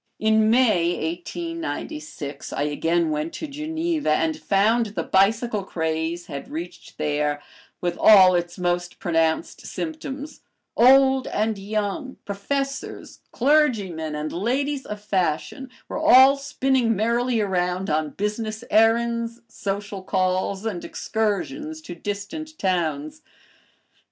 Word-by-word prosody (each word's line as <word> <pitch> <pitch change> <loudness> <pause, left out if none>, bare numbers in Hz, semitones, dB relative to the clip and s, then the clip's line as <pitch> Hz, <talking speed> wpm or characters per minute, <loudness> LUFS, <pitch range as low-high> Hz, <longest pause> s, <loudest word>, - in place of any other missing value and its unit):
In 220 0 +3
May, 175 -9 +2
1896, 155 - -6
I 145 - -1
again 165 +2 0
went 155 +2 -2
to - - -5
Geneva 315 - -2
and 160 +1 +1
found 220 +4 +2
the 205 - -4
bicycle 210 +2 +2
craze 160 -1 -2
had 140 - -7
reached 170 +4 -8
there, 150 0 0 0.4
with 175 -1 -2
all 190 -4 +8
its 175 -1 -1
most 175 -1 -1
pronounced 165 -5 0
symptoms; 305 -2 -6 0.3
old 265 +1 +5
and 215 -1 -1
young, 215 +7 -3
professors, 275 +8 -4
clergymen, 215 - +1
and 150 +1 -4
ladies 265 +8 -1
of 210 0 -5
fashion 200 - -2 0.2
were - - -4
all 265 +2 +7
spinning 265 -4 +1
merrily 235 +3 +1
around 185 -2 0
on 155 0 0
business 215 +5 -3
errands, 230 +2 +2
social 200 -2 -4
calls, 185 +1 -1
and 195 -6 -3
excursions 275 - -2
to 180 - -8
distant 205 - -6
towns. 155 -6 -1
205 Hz, 115 wpm, -23 LUFS, 175-255 Hz, 0.4 s, all